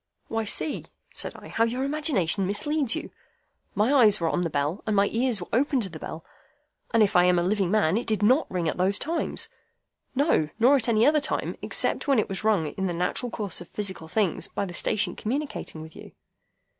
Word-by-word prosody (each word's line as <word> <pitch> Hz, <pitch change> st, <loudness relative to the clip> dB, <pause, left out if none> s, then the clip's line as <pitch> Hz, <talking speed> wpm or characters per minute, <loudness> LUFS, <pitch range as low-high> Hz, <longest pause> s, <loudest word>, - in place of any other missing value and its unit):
"Why, 225 Hz, -1 st, -1 dB
see," 295 Hz, +8 st, -2 dB, 0.3 s
said -, -, -3 dB
I, -, -, -11 dB
"how 225 Hz, -, +1 dB
your 245 Hz, +3 st, -1 dB
imagination 270 Hz, -, 0 dB
misleads 275 Hz, +5 st, +1 dB
you. -, -, -6 dB, 0.6 s
My 215 Hz, +7 st, +2 dB
eyes 220 Hz, -7 st, +5 dB
were 165 Hz, -1 st, 0 dB
on 175 Hz, -, 0 dB
the 170 Hz, -, -1 dB
bell, 145 Hz, +6 st, -1 dB
and 215 Hz, -, +1 dB
my 200 Hz, 0 st, +4 dB
ears 235 Hz, -1 st, 0 dB
were 175 Hz, -, -7 dB
open 270 Hz, +3 st, +2 dB
to 195 Hz, -, -3 dB
the 160 Hz, -2 st, -9 dB
bell, 160 Hz, +2 st, -7 dB, 0.7 s
and 230 Hz, -2 st, +5 dB
if 205 Hz, 0 st, 0 dB
I 180 Hz, 0 st, +6 dB
am 180 Hz, 0 st, +4 dB
a 175 Hz, -, +2 dB
living 195 Hz, 0 st, +1 dB
man, 200 Hz, -3 st, +2 dB
it 235 Hz, -, -3 dB
did 215 Hz, -2 st, 0 dB
NOT 255 Hz, +9 st, +3 dB
ring 175 Hz, -3 st, -2 dB
at -, -, -2 dB
those 190 Hz, +3 st, +2 dB
times. 325 Hz, +7 st, -2 dB, 0.7 s
No, 270 Hz, -, +2 dB
nor 245 Hz, +5 st, +5 dB
at 250 Hz, -3 st, 0 dB
any 220 Hz, 0 st, +4 dB
other 300 Hz, +1 st, +4 dB
time, 295 Hz, -, -2 dB
except -, -, +1 dB
when 275 Hz, -2 st, +4 dB
it 215 Hz, -, +2 dB
was 195 Hz, +1 st, -3 dB
rung 210 Hz, -7 st, +2 dB
in 190 Hz, 0 st, -2 dB
the 175 Hz, -, -2 dB
natural 180 Hz, +8 st, -1 dB
course 205 Hz, -7 st, -4 dB
of 175 Hz, -, -11 dB
physical 190 Hz, -6 st, -3 dB
things 195 Hz, 0 st, 0 dB
by 200 Hz, -, -3 dB
the 180 Hz, -, -8 dB
station 210 Hz, +4 st, 0 dB
communicating 250 Hz, -, -4 dB
with 160 Hz, 0 st, -13 dB
you." -, -, -12 dB
210 Hz, 220 wpm, -26 LUFS, 180-250 Hz, 0.7 s, I